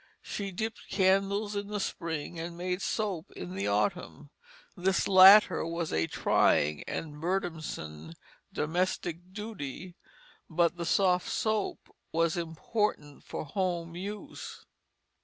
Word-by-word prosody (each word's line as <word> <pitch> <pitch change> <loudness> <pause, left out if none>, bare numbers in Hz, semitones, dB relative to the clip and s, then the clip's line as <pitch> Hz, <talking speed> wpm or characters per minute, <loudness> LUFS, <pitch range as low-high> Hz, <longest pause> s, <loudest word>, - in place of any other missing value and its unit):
She 200 -1 -4
dipped 220 +4 -5
candles 195 +2 +2
in 200 0 -3
the 210 0 -3
spring, 165 -3 -4
and 170 +1 -5
made 180 +1 -2
soap 195 -8 -2
in 90 0 -6
the 100 +1 -2
autumn. 145 - -1 0.4
This 190 0 +1
latter 195 +2 +8
was 165 0 -3
a 80 +1 +1
trying 75 0 +2
and 150 -2 -5
burdensome 155 - -3 0.4
domestic 175 +1 -2
duty, 185 -5 -6 0.6
but 170 0 +2
the 170 -1 -4
soft 180 0 +3
soap 215 -2 -1 0.2
was 165 0 +2
important 165 -2 -2
for - - -5
home 170 0 -2
use. 200 +3 -7
175 Hz, 120 wpm, -30 LUFS, 160-195 Hz, 0.6 s, latter